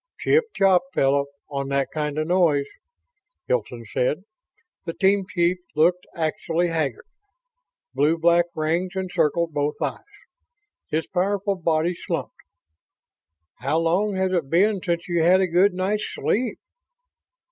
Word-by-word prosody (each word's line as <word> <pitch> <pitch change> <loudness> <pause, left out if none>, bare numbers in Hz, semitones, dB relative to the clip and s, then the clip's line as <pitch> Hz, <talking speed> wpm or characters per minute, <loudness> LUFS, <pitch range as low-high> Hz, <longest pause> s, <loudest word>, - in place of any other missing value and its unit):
"Chip 470 +1 +3
chop, 190 -2 +4
fellow, 140 +1 +2 0.2
on 140 -1 -4
that 140 0 0
kind 150 -1 -2
of 155 0 -1
noise," 165 -6 +3 0.8
Hilton 120 -1 -2
said. 125 - -1 0.6
The 165 - -3
team 195 0 +2
chief 175 0 +1 0.2
looked 175 +4 +2
actually 165 +1 -1
haggard. 155 -8 -2 0.9
Blue 155 +3 +2
black 170 +1 +4
rings 170 +4 -1
encircled 170 -3 0
both 145 0 -1
eyes. - - -2 0.9
His 160 +1 -1
powerful 195 +2 0
body 165 -1 0
slumped. - - -4 1.3
"How 140 +5 0
long 180 +5 +1
has 190 0 0
it 170 -7 -1
been 195 +4 +3
since 170 -1 -2
you 175 -2 +1
had 180 +3 +5
a 190 - +3
good 180 +3 +3
night's 205 +3 -1
sleep?" 245 +3 -1
170 Hz, 130 wpm, -23 LUFS, 155-185 Hz, 1.3 s, had